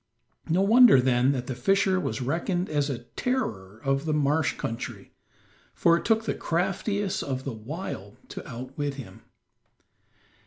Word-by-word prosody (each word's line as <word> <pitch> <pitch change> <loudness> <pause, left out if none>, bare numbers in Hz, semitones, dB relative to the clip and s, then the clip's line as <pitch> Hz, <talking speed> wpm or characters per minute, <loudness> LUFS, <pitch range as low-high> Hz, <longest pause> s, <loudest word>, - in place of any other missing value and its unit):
No 180 +4 +3
wonder 230 - +7
then 125 +1 +3
that 125 -2 -3
the 130 - -3
fisher 190 +8 +2
was 145 - -3
reckoned 175 +6 -1
as 145 -1 +1
a 120 -3 -4
terror 110 - -2
of 135 +1 0
the 155 -1 0
marsh 145 -1 +2
country, 115 - -6 0.6
for 170 - +4
it 170 - -3
took 225 0 +2
the - - 0
craftiest 195 +3 -1
of 130 -2 -3
the 135 - -4
wild 110 - -7
to - - -8
outwit 135 +4 -4
him. 135 -3 -10
145 Hz, 150 wpm, -26 LUFS, 125-185 Hz, 0.6 s, wonder